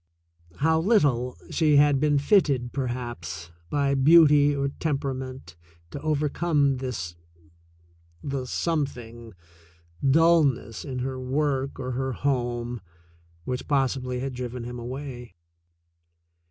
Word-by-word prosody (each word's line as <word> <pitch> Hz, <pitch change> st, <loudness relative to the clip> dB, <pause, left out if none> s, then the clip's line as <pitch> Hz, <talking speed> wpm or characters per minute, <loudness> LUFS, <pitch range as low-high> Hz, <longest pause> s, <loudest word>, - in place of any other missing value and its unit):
How 160 Hz, +1 st, +3 dB
little 145 Hz, -, +2 dB
she 155 Hz, -3 st, +3 dB
had 145 Hz, -1 st, +5 dB
been 145 Hz, 0 st, +2 dB
fitted, 140 Hz, -, +2 dB
perhaps, 120 Hz, -, -5 dB, 0.2 s
by 140 Hz, -1 st, +1 dB
beauty 145 Hz, 0 st, +6 dB
or 140 Hz, 0 st, -1 dB
temperament 130 Hz, -, -4 dB, 0.4 s
to 140 Hz, -, -7 dB
overcome 150 Hz, -2 st, +1 dB
this 115 Hz, -11 st, -5 dB, 0.6 s
— 85 Hz, 0 st, -32 dB
the 130 Hz, -2 st, -3 dB
some 155 Hz, +2 st, 0 dB
thing 115 Hz, -4 st, -11 dB, 0.3 s
— 85 Hz, +7 st, -5 dB
dullness 155 Hz, -9 st, +2 dB
in 130 Hz, -3 st, -5 dB
her 130 Hz, -1 st, -4 dB
work 135 Hz, +1 st, -1 dB
or 130 Hz, -1 st, -3 dB
her 130 Hz, +1 st, -2 dB
home, 120 Hz, -3 st, -2 dB, 0.6 s
which 125 Hz, 0 st, -4 dB
pos 135 Hz, -3 st, +2 dB
sibly 125 Hz, -1 st, -4 dB
had 135 Hz, 0 st, -3 dB
driven 125 Hz, -1 st, -5 dB
him 120 Hz, +1 st, -6 dB
away. 125 Hz, -1 st, -7 dB
130 Hz, 120 wpm, -26 LUFS, 120-145 Hz, 0.6 s, beauty